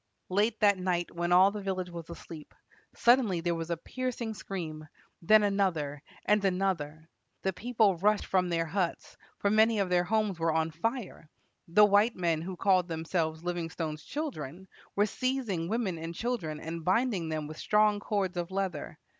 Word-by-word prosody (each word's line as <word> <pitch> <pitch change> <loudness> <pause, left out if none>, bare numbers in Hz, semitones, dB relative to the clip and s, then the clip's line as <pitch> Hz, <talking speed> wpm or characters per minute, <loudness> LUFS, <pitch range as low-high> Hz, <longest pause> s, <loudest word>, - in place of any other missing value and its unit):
Late 210 +4 +1
that 200 -2 +4
night, 180 -2 -1
when 175 +1 -2
all 185 +2 +7
the 210 0 -5
village 185 -2 -3
was 170 -1 -8
asleep, 165 -2 -10 0.4
suddenly 235 -7 +4
there 170 +1 0
was 165 0 -4
a 170 - -1
piercing 245 +3 -4
scream, 160 -7 -6 0.3
then 215 +5 +6
another, 175 -8 0 0.2
and 210 -1 +3
another. 180 -5 -1 0.4
The 190 - 0
people 220 -3 +2
rushed 210 +4 +2
from 185 -2 +1
their 165 -1 0
huts; 175 +1 -2 0.2
for 200 - +1
many 220 +1 +4
of 195 -2 0
their 175 0 +4
homes 210 -3 0
were 165 0 +2
on 160 0 +1
fire. 190 -1 -4 0.4
The 210 +5 +6
white 205 +3 +4
men, 170 -3 0
who 180 +2 -6
called 185 -2 +3
themselves 160 -1 -2
Livingstone's 165 -3 -3
children, 190 - -5 0.3
were 205 - +4
seizing 220 -8 -2
women 210 -7 -1
and 165 +1 -6
children, 185 -11 -3
and 165 +1 -6
binding 190 -2 +1
them 155 -1 -2
with 155 +1 -8
strong 210 -1 +3
cords 195 -3 -2
of 175 0 -2
leather. 190 -6 -3
185 Hz, 170 wpm, -30 LUFS, 165-210 Hz, 0.4 s, all